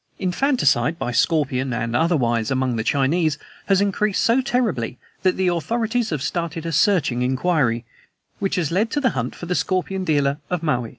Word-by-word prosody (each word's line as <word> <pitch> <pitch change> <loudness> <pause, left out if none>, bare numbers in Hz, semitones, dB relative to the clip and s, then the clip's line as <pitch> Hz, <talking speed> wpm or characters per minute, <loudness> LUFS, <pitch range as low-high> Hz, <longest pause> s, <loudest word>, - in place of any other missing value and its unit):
"Infanticide, 180 - +1
by 120 - -3
scorpion 135 0 +1
and 115 0 -2
otherwise, 120 -8 +1
among 130 -2 0
the 110 - -1
Chinese, 145 +4 +1 0.3
has 195 -1 +3
increased 200 0 +1
so 235 +3 +3
terribly 225 - -1 0.2
that 185 -1 +2
the 190 -1 +1
authorities 225 +7 0
have 150 -5 -2
started 170 0 -3
a 165 - -2
searching 155 - +2
inquiry, 130 -3 +1 0.5
which 195 -1 -1
has 170 -5 -1
led 205 +6 +1
to 295 - -1
the 260 -3 +2
hunt 125 -1 -3
for - - -8
the 180 - -1
scorpion 185 +4 -1
dealer 145 -4 +1
of 180 -2 -2
Maui. 125 -7 0
165 Hz, 175 wpm, -22 LUFS, 130-190 Hz, 0.5 s, has